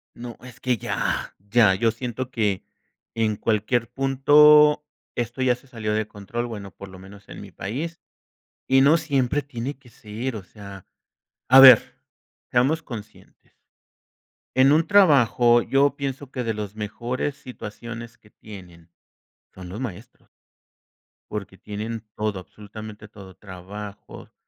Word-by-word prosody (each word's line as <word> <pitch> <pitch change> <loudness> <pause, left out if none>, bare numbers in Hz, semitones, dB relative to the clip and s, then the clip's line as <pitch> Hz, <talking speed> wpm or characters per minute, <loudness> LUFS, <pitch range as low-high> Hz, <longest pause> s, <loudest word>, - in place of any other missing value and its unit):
No, 120 -1 -8
es 125 -2 -13
que, 125 -1 0
¡ya!, - - -3
ya, 100 0 +3
yo 115 +4 +1
siento 125 +2 -5
que 105 -6 -1 0.5
en 110 -2 0
cualquier 110 +3 0
punto 150 +3 +5 0.3
esto 120 +2 -4
ya 125 -1 +3
se 125 - -17
salió 110 -4 -3
de 110 0 -1
control, 110 +4 -5
bueno 105 -5 -8
por 100 - -11
lo 95 0 -13
menos 100 +2 -15
en - - -10
mi 100 -2 -11
país, 145 - -5 0.7
y 135 0 +5
no 145 +5 +5
siempre 140 -2 0
tiene 135 0 -6
que 135 - -20
ser, 115 +3 -6
o 100 - -8
sea, 100 -1 -12 0.6
a 130 +1 +8
ver, 130 -4 +8 0.6
seamos 140 +7 +2
conscientes. 110 -6 -12 1.0
En 130 +2 +5
un 160 +2 +3
trabajo 130 - +5
yo 140 +2 +2
pienso 140 -1 -5
que 125 - -3
de 115 -1 -1
los 105 -1 -6
mejores 120 +6 -4
situaciones 115 0 -9
que 105 - -23
tienen, 90 -7 -14 0.6
son 95 -1 -10
los 100 +6 -7
maestros. 115 -9 -9 1.0
Porque 100 -2 -6
tienen 110 +3 -6
todo, 105 -3 -2
absolutamente 105 +2 -11
todo, 100 -3 -14
trabajos, 100 +2 -10
115 Hz, 140 wpm, -23 LUFS, 105-130 Hz, 1.0 s, a